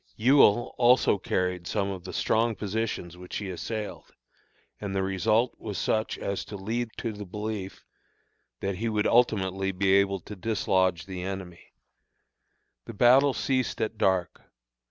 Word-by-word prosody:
Ewell 120 -1 +4
also 120 -4 +4
carried 90 -1 -1
some 100 -1 -1
of 95 -2 -7
the 95 - -6
strong 115 0 +1
positions 100 -3 -3
which 90 0 -6
he 100 -2 -4
assailed; 105 +4 -5 0.7
and 100 -2 -4
the 95 - +1
result 110 +5 +1
was 105 -4 -5
such 110 +5 0
as 100 - -3
to 105 - -9
lead 115 +5 -2
to 115 - -3
the 105 0 -7
belief 105 0 -6 0.8
that 100 -1 -2
he 115 +3 -1
would 105 -1 0
ultimately 95 -5 +2
be 95 +1 +1
able 100 0 +3
to 105 - -9
dislodge 95 -4 0
the 95 -2 -6
enemy. 95 -2 -7 1.1
The 115 - -9
battle 130 +4 +5
ceased 130 +3 -1
at 110 0 -2
dark. 95 -3 +1
100 Hz, 150 wpm, -27 LUFS, 95-110 Hz, 1.1 s, battle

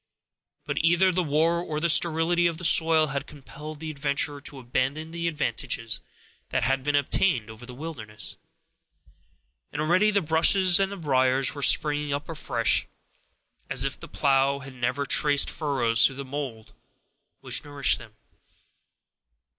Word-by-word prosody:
But - - -3
either 175 +4 +3
the 185 +1 0
war 165 +2 +1
or 150 -3 -4
the 170 - +1
sterility 170 +1 +3
of 165 -2 -3
the 180 - -5
soil 160 -2 +4
had 140 0 -4
compelled 150 +1 -11
the 160 0 -6
adventurer 140 0 -1
to 145 -1 -7
abandon 135 +5 -3
the 170 0 -3
advantages 130 -7 -2 0.5
that - - -1
he - - +1
had 135 +1 -1
obtained 130 - +1
over 115 +3 -13
the 125 - -10
wilderness, 125 -8 -8 1.4
and - - -6
already 180 +7 +2
the 205 -1 +2
bushes 175 +4 +4
and 195 0 -2
briers 130 -1 +2
were 140 - -8
springing 150 0 +3
up 145 +1 -4
afresh, 125 -7 0 0.8
as - - -1
if - - -3
the - - -10
plow 135 0 +1
had 140 -1 -10
never 130 +3 -2
traced 145 0 +3
furrows 125 -7 +1
through 135 - +3
the 140 +1 -7
mold 130 -5 -7 0.7
which - - 0
nourished 145 -1 0
them. 115 -3 -14
145 Hz, 150 wpm, -25 LUFS, 135-165 Hz, 1.4 s, soil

